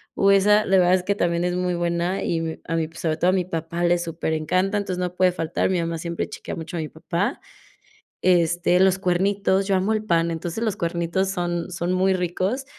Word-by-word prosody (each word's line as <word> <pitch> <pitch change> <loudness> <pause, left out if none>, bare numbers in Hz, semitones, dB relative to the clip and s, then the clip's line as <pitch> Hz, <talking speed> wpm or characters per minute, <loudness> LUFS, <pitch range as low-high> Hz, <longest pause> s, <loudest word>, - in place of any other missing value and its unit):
Uh, 195 - +4
esa, 210 +2 +4
la 190 -1 +3
verdad 180 0 +5
es 185 - -1
que 200 +2 0
también 170 -3 0
es 180 0 -1
muy 180 0 -1
buena, 170 +2 -1
y 165 -1 -1
mi 160 -1 -4
a 165 - -2
mi, 160 -1 -1
sobre 160 -1 -2
todo 175 +3 +2
a - - +3
mi 185 -2 +1
papá 170 0 -4
le 175 0 +3
superencanta, 170 +3 -1
entonces 195 -3 -3
no 180 -1 -3
puede 185 0 +3
faltar, 165 -1 -1
mi 185 -2 +1
mamá 165 0 -2
siempre 170 +1 -3
chequea - - -7
mucho 165 +1 -7
a - - -2
mi 155 - -5
papá. 170 +4 -2 0.8
Este, 175 0 +3
los 190 0 +4
cuernitos, 195 +1 +1
yo 195 - +2
amo 190 +4 +1
el 215 0 -1
pan, 170 -4 +1
entonces 170 +6 -4
los 215 -3 0
cuernitos 170 +2 -1
son 175 -2 -2
son 175 +1 -2
muy 190 +1 +2
ricos. 185 +8 -1
180 Hz, 220 wpm, -23 LUFS, 170-190 Hz, 0.8 s, verdad